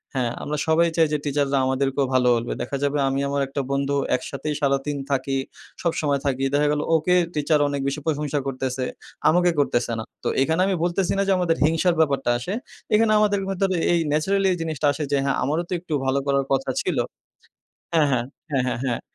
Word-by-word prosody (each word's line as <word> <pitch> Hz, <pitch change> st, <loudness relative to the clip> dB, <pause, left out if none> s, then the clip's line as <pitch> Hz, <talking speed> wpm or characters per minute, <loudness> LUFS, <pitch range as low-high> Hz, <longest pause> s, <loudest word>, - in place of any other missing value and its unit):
হ্যাঁ, 125 Hz, -3 st, 0 dB
আমরা 150 Hz, +1 st, -3 dB
সবাই 165 Hz, +2 st, +4 dB
চাই 165 Hz, -1 st, +5 dB
যে -, -, +3 dB
টিচাররা 140 Hz, -1 st, +1 dB
আমাদেরকেও 135 Hz, +1 st, +1 dB
ভালো 125 Hz, -1 st, +3 dB
বলবে। 115 Hz, 0 st, -2 dB
দেখা 125 Hz, +3 st, -3 dB
যাবে 145 Hz, +1 st, +1 dB
আমি 135 Hz, +1 st, -1 dB
আমার 140 Hz, 0 st, 0 dB
একটা 140 Hz, +1 st, -3 dB
বন্ধু 140 Hz, +1 st, 0 dB, 0.2 s
একসাথেই 140 Hz, +4 st, -4 dB
সারাদিন 140 Hz, +1 st, 0 dB
থাকি, 135 Hz, 0 st, 0 dB, 0.5 s
সবসময় 150 Hz, -4 st, 0 dB
থাকি। 135 Hz, -1 st, 0 dB
দেখা 145 Hz, +1 st, +3 dB
গেল 150 Hz, 0 st, 0 dB
ওকে 170 Hz, +3 st, +2 dB, 0.2 s
টিচার 150 Hz, +1 st, +2 dB
অনেক 140 Hz, -1 st, -2 dB
বেশি 140 Hz, +2 st, -2 dB
প্রশংসা 150 Hz, -2 st, -1 dB
করতেছে। 130 Hz, -1 st, -2 dB, 0.4 s
আমাকে 175 Hz, +2 st, +4 dB
করতেছে 120 Hz, -4 st, +1 dB
না। -, -, -3 dB, 0.2 s
তো -, -, -2 dB
এখানে 160 Hz, +6 st, +2 dB
আমি 195 Hz, -, +1 dB
বলতেছি 175 Hz, +1 st, 0 dB
না -, -, +2 dB
যে, -, -, +3 dB
আমাদের 175 Hz, -2 st, +1 dB
হিংসার 165 Hz, +3 st, +2 dB
ব্যাপারটা 140 Hz, -5 st, +2 dB
আসে। 125 Hz, +11 st, -4 dB, 0.4 s
এখানে 220 Hz, 0 st, +4 dB
আমাদের 205 Hz, -1 st, +2 dB
ভিতরে 195 Hz, 0 st, 0 dB, 0.2 s
এই 170 Hz, -, +3 dB
ন্যাচারালি 190 Hz, +6 st, +2 dB
জিনিসটা 155 Hz, -2 st, -1 dB
আসে 150 Hz, -, -4 dB
যে, 140 Hz, -, +3 dB
হ্যাঁ, 140 Hz, -1 st, +1 dB
আমারও 150 Hz, +6 st, 0 dB
তো -, -, -2 dB
একটু 170 Hz, -2 st, -6 dB
ভালো 135 Hz, +1 st, +2 dB
করার 140 Hz, -1 st, +2 dB
কথা 135 Hz, 0 st, +1 dB
ছিল। -, -, -2 dB, 1.0 s
হ্যাঁ, 160 Hz, -2 st, +5 dB
হ্যাঁ। 120 Hz, -2 st, +1 dB, 0.3 s
হ্যাঁ, 135 Hz, -3 st, +1 dB
হ্যাঁ, 120 Hz, -, -2 dB
হ্যাঁ। 120 Hz, -2 st, -1 dB
145 Hz, 195 wpm, -23 LUFS, 135-165 Hz, 1.0 s, চাই